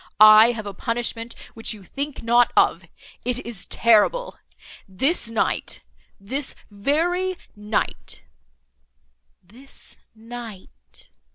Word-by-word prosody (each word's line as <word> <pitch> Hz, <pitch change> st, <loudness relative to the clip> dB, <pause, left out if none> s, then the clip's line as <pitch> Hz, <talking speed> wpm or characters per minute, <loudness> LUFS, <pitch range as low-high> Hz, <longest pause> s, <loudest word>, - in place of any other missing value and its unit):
I 215 Hz, +2 st, +9 dB
have 215 Hz, -2 st, -6 dB
a 200 Hz, -, -6 dB
punishment 230 Hz, +1 st, -3 dB, 0.2 s
which 225 Hz, 0 st, -3 dB
you 205 Hz, -, -14 dB
think 280 Hz, +8 st, -5 dB
not 240 Hz, +1 st, +4 dB
of; -, -, +3 dB, 0.4 s
it 250 Hz, +1 st, -2 dB
is 225 Hz, -5 st, -5 dB
terrible! 235 Hz, -, +2 dB, 0.5 s
This 250 Hz, -, +1 dB
night—this 195 Hz, -, -3 dB, 0.2 s
very 340 Hz, -, 0 dB, 0.2 s
night—" 210 Hz, +1 st, -4 dB, 1.2 s
"This 240 Hz, +10 st, -10 dB, 0.2 s
night!" 220 Hz, -, -11 dB
230 Hz, 95 wpm, -23 LUFS, 210-260 Hz, 1.2 s, I